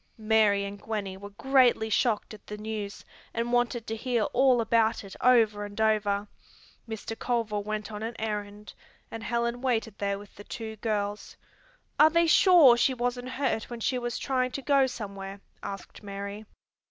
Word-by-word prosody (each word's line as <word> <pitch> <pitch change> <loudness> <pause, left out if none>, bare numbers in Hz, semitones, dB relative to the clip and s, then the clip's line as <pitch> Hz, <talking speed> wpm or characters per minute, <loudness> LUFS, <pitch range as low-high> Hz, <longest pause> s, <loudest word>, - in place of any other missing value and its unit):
Mary 215 -2 +3
and 200 0 -7
Gwenny 205 -4 -4
were 200 +1 -9
greatly 250 +1 +3
shocked 220 0 +1
at 210 - -14
the 210 - -6
news, 210 -1 -5 0.3
and 235 +1 -1
wanted 240 -1 +1
to 225 - -3
hear 235 0 0
all 255 -1 +4
about 225 0 +2
it 195 - -10
over 225 -4 +4
and 205 +1 -8
over. 210 -2 +1 0.6
Mr. 220 0 -5
Culver 225 -3 -1
went 215 +1 -4
on 210 0 -6
an 225 +1 -4
errand 210 -1 -5 0.4
and 225 - -6
Helen 235 +1 -1
waited 225 -5 -1
there 200 -1 -1
with 205 0 -13
the 205 - -12
two 220 +1 -6
girls. 210 -1 -3 0.6
"Are 305 - +8
they 335 +1 +3
sure 330 -6 +7
she 260 +2 +2
wasn't 245 +1 -2
hurt 255 -4 -1
when 240 -1 -6
she 250 +2 0
was 240 -1 -3
trying 255 -2 0
to 275 - -4
go 275 -1 +4
somewhere?" 200 -4 -7 0.2
asked 195 -1 -8
Mary. 200 +1 -6
220 Hz, 170 wpm, -28 LUFS, 205-245 Hz, 0.6 s, Are